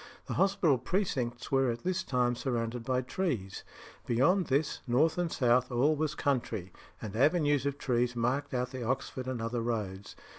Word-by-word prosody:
The - - -4
hospital 190 - +3
precincts 125 - -2
were 135 -1 +3
at 115 0 -3
this 185 0 0
time 125 -6 +1
surrounded 120 -2 -2
by 130 +1 0
trees. 125 - -3 0.4
Beyond 165 +10 +3
this, 140 +3 0
north 150 +8 +2
and 175 -2 0
south, 125 0 +2
all 135 +6 +3
was 150 0 -1
country; 115 -9 -1 0.3
and 105 -1 -6
avenues 145 +1 +3
of 140 0 -2
trees 125 -2 0
marked 130 +5 0
out 125 0 -1
the 130 -2 -5
Oxford 130 +1 -2
and 130 -2 -2
other 115 +1 -2
roads. 105 -4 -3
125 Hz, 170 wpm, -31 LUFS, 120-145 Hz, 0.4 s, hospital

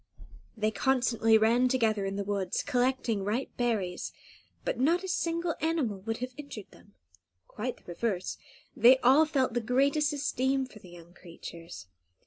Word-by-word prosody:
They 215 0 +1
constantly 235 -2 +3
ran 230 +3 +3
together 225 -6 +1
in 195 - -3
the 200 - -2
woods, 195 -2 -2
collecting 250 -5 0
ripe 220 +7 -2
berries; 215 -7 -1 0.5
but - - -2
not 335 +8 +2
a - - -4
single 335 -2 -1
animal 300 -11 0
would 225 +3 -3
have 255 - -16
injured 280 -9 -9
them; 205 - -20 0.5
quite 245 +4 -4
the - - -23
reverse, 185 +1 -3 0.4
they 250 +3 +7
all 275 +6 +6
felt 265 -5 0
the 240 - 0
greatest 280 +6 +2
esteem 270 -2 0
for 225 -4 -14
the 185 - -14
young 175 0 -14
creatures. 170 - -10
240 Hz, 155 wpm, -29 LUFS, 205-270 Hz, 0.5 s, they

